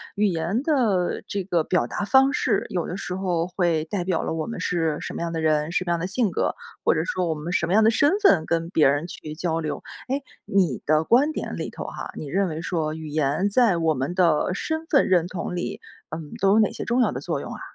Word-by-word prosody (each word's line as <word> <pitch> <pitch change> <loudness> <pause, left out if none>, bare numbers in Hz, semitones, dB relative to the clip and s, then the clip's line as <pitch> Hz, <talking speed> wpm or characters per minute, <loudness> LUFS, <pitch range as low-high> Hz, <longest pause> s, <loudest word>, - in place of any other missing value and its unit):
语 210 +1 +2
言 180 +5 -1
的 235 - +1
这 200 -1 -2
个 175 -3 +1
表 180 +3 +1
达 205 - -3
方 270 +4 +5
式， - - 0
有 175 -3 -2
的 180 - -4
时 180 - -4
候 175 -3 -1
会 175 -4 0
代 180 +1 -2
表 180 -2 0
了 - - -2
我 160 -1 -2
们 230 - -5
是 165 -4 0
什 - - -5
么 - - -4
样 170 0 -2
的 165 - -2
人， 155 0 +1
什 185 +1 0
么 175 - -1
样 170 - +1
的 170 - -2
性 210 +3 0
格， - - 0 0.3
或 - - +4
者 160 - 0
说 180 -1 -1
我 160 - +1
们 155 +4 -5
什 175 - +1
么 170 - -1
样 220 +2 +5
的 220 - +6
身 285 +6 +3
份 180 - +5
跟 165 0 -1
别 155 -6 +4
人 145 +4 0
去 155 -3 -8
交 165 0 -1
流。 155 -2 -3 0.3
诶， 275 +2 0 0.2
你 180 -10 +1
的 155 +1 +3
观 260 - +4
点 - - -4
里 - - -4
头 - - -7
哈， - - -6
你 150 - -6
认 190 +7 +1
为 160 -1 -4
说 160 -3 -2
语 160 -1 -7
言 150 +4 0
在 210 -4 +3
我 165 -1 +2
们 140 +5 -3
的 170 -3 +3
身 315 - -3
份 285 -5 +3
认 175 -2 +3
同 180 -1 -4
里， 175 - -3 0.3
嗯， 155 -2 -7
都 195 - +4
有 220 - +5
哪 215 - +3
些 - - -5
重 240 +2 +2
要 - - +3
的 - - -4
作 - - -2
用 - - -7
啊？ - - -9
175 Hz, 275 characters per minute, -24 LUFS, 160-200 Hz, 0.3 s, 的